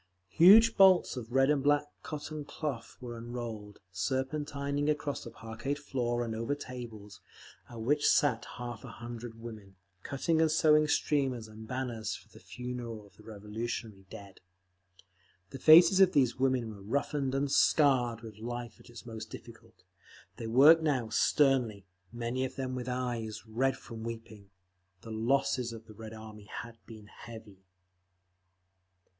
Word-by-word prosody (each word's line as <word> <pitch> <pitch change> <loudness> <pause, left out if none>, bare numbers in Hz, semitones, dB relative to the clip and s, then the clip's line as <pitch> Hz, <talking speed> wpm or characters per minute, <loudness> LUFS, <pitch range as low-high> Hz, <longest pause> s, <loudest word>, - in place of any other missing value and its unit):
Huge 220 +7 +7
bolts 190 -5 +6
of 120 -2 -7
red 135 +2 +4
and 145 -2 +1
black 145 +1 +3 0.2
cotton 155 0 -6
cloth 145 -4 -5
were 120 -2 -7
unrolled, 115 -3 -7
serpentining 140 +8 -2
across 150 -1 -2
the - - -8
parqueted 115 +6 -5
floor 120 -4 -2
and 115 - -4
over 115 +6 -2
tables, 110 -7 -9 0.5
at 120 - -9
which 145 +6 +2
sat 125 -6 +2
half 120 -1 -6
a 125 -3 -9
hundred 120 -1 -8
women, 110 -4 -10 0.3
cutting 160 - 0
and 160 - +4
sewing 155 -1 +4
streamers 135 -6 0
and 110 +1 -11
banners 125 -3 -3
for - - -14
the - - -16
Funeral 120 -3 -7
of 100 - -21
the - - -15
Revolutionary 105 -1 -6
Dead. 100 -1 -11 1.1
The 135 - -7
faces 170 +6 +8
of 190 -1 +6
these 130 -4 +3
women 130 -3 0
were 100 - -13
roughened 135 +4 -1
and 140 0 0
scarred 125 -8 +3
with 110 -2 -11
life 120 -1 -6
at - - -17
its 120 0 -11
most 110 -2 -8
difficult; 115 -1 -13 0.5
they 115 - -5
worked 145 +8 +7
now 135 -8 0
sternly, 120 -4 +2 0.3
many 120 +2 -3
of 130 - -4
them 130 -1 -3
with 125 -1 -4
eyes 120 -4 -3
red 125 +5 0
from 115 -1 -10
weeping…. 115 -3 -8 0.5
The 115 - -10
losses 125 +2 0
of 115 -1 -10
the 110 - -13
Red 110 +1 -9
Army 110 -1 -11
had 115 +2 -9
been 110 -2 -11
heavy. 110 -3 -12
120 Hz, 150 wpm, -31 LUFS, 110-140 Hz, 1.1 s, faces